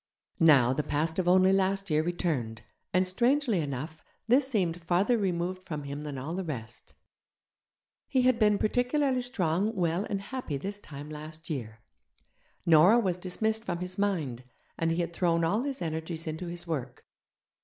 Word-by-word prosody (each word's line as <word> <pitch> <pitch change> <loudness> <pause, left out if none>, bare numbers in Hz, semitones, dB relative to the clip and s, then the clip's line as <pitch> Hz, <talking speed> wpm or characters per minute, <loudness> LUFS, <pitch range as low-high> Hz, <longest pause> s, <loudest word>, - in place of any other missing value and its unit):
Now, 140 -7 +6
the 135 - 0
past 160 +4 -1
of 180 - 0
only 185 +1 +5
last 195 -1 +1
year 155 0 +3
returned, 150 - -2 0.3
and, 185 +1 +2
strangely 240 +2 +2
enough, 150 +2 -4 0.3
this 260 +4 +4
seemed 180 -9 0
farther 180 +8 +2
removed 185 -3 -1
from 155 -6 -6
him 140 +1 -5
than 145 -2 -5
all 140 +6 -4
the 190 +2 -2
rest. 120 -8 -7 1.1
He 260 -2 +2
had 250 -2 +3
been 210 -2 +4
particularly 250 +4 +1
strong, 205 -3 -1
well, 175 +1 0
and 200 - -1
happy 200 - -4
this 200 +8 -5
time 145 -4 -9
last 155 +2 -8
year. 110 -6 -5 0.8
Nora 170 +7 +7
was 185 -6 0
dismissed 220 +5 -1
from 175 -6 -2
his 180 +2 -4
mind, 155 -12 -1 0.3
and 165 - 0
he 165 +2 +1
had 170 0 -3
thrown 170 -1 +1
all 200 +8 +2
his 275 -7 -3
energies 160 0 -4
into 160 +3 -4
his 175 0 -5
work. 135 -7 -5
175 Hz, 165 wpm, -29 LUFS, 155-200 Hz, 1.1 s, Nora